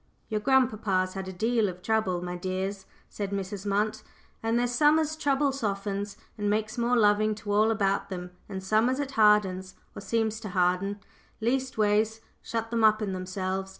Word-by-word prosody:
"Your 215 - 0
grandpapa's 215 -7 +2
had 190 -1 -5
a - - -4
deal 220 +2 +1
of 180 0 -9
trouble, 190 -5 0
my 180 0 -4
dears," 190 +2 -3 0.2
said 200 -2 -4
Mrs. 200 0 -4
Munt. 210 +2 0 0.4
"And 225 +1 +1
there's 245 0 +1
some 295 +5 +4
as 315 0 0
trouble 285 -2 +1
softens 200 -4 -3 0.2
and 205 0 0
makes 215 +1 0
more 240 +1 +2
loving 215 0 +3
to 205 -1 -6
all 215 +2 +4
about 200 -3 0
them 180 -2 -6 0.2
and 190 -2 -5
some 215 +5 +3
as 260 +2 -1
it 280 -2 -2
hardens, 210 -5 +3 0.2
or - - -8
seems 220 -1 -1
to 215 -2 -6
harden, 185 +2 0 0.4
leastways 220 -3 +1
to - - -27 0.2
shut 225 0 -4
them 230 -1 +1
up 215 0 +5
in 195 -2 -2
themselves. 185 +1 -3
210 Hz, 185 wpm, -28 LUFS, 190-225 Hz, 0.4 s, up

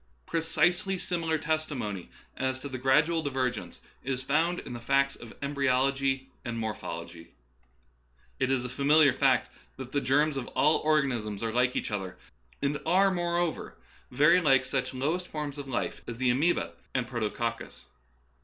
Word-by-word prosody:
Precisely 175 +3 +1
similar 165 -3 -1
testimony 145 - -3 0.3
as 130 0 -1
to 130 - -7
gradual 140 +6 +2
diver 130 -4 0
gence - - -8 0.3
is 130 0 -2
found 160 +6 +1
in 125 - -8
the 120 - -5
facts 135 +3 +2
of 115 - -11
embryology 135 -1 +1
and 115 -1 -4
morphology. 85 -6 -6 1.0
It 130 - +1
is 130 -2 +1
a - - -4
familiar 140 +3 +4
fact 130 -3 +2 0.3
that 130 -1 -7
the 145 - 0
germs 145 +3 +2
of 125 - -4
all 150 +2 +4
organisms 125 -9 0
are 110 -1 -1
like 125 +1 +2
each - - -2
other, 95 -3 -4 0.5
and 145 +1 0
are, 190 +4 +4
moreover, 175 -2 -1 0.3
very 150 +8 +5
like 135 -5 +4
such 130 -1 -1
lowest 160 +8 -1
forms 150 -2 -5
of 140 - -6
life 130 - -3
as 115 - -5
the 125 0 +2
amoeba 130 - +1 0.2
and 125 - +1
protococcus. 115 -1 -3
135 Hz, 155 wpm, -29 LUFS, 125-155 Hz, 1.0 s, very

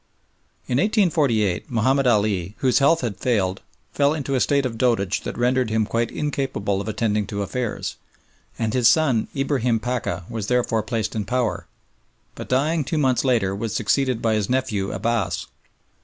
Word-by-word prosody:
In 125 - +1
1848 155 - +1
Mahomed 130 +3 +2
Ali, 105 -4 +1
whose 130 -2 +2
health 145 +4 +4
had 115 -6 -3
failed, 100 -6 0 0.3
fell 145 +2 +2
into 140 -3 -3
a 130 - +2
state 140 +2 +2
of 120 -3 -3
dotage 110 -6 +1
that - - -6
rendered 125 0 +1
him 110 0 +1
quite 115 +2 -1
incapable 135 -9 -2
of 100 - -7
attending 105 -1 0
to 100 -1 -3
affairs, 115 +3 -3 0.6
and 110 -1 -1
his 125 -2 +4
son 125 -3 +3
Ibrahim 130 -4 +1
Pacha 115 -8 -3
was 110 -3 -5
therefore 120 -3 +1
placed 110 0 -3
in 105 -2 -2
power, 115 -5 -1 0.7
but - - -9
dying 150 +5 +1
two 155 +4 -2
months 130 -4 +2
later 115 -8 +1
was 110 +1 -4
succeeded 125 +2 0
by 115 -1 +2
his 105 -3 0
nephew 120 -7 -1
Abbass. 115 -4 -1
120 Hz, 165 wpm, -23 LUFS, 105-130 Hz, 0.7 s, health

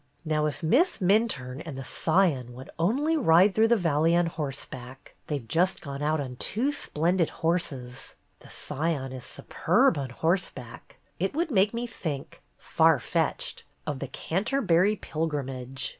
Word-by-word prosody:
Now 155 -1 +1
if 150 - -5
Miss 285 - +3
Minturne 180 - +1
and 155 -5 -7
the 135 - -5
Scion 150 -6 +1
would 130 +1 -10
only 275 - +2
ride 190 - +5
through 220 +2 +4
the 235 0 +4
valley 165 -2 +2
on 175 0 +3
horse 145 -5 -4
back, 130 +1 -11
— - - -41
they 150 - -1
've 120 -5 -10
just 180 +7 +2
gone 140 -2 -7
out 155 +1 +1
on 130 -3 -5
two 245 - 0
splendid 170 - +1 0.2
horses; 135 -7 -2 0.2
the - - -16
Scion 145 -3 -2
is 130 -1 -8
superb - - +1
on 135 -2 -4
horseback, 150 -4 -3
— - - -40
it 190 +9 -1
would 330 0 0
make 200 -2 +4
me 235 +1 -3
think 160 - -6
— - - -42 0.2
far - - +6
fetched! - - -1
— - - -41
of 145 -3 -3
the 140 - -4
Canterbuiy 195 - +1
Pilgrimage. 135 -5 -3
160 Hz, 175 wpm, -27 LUFS, 135-190 Hz, 0.2 s, far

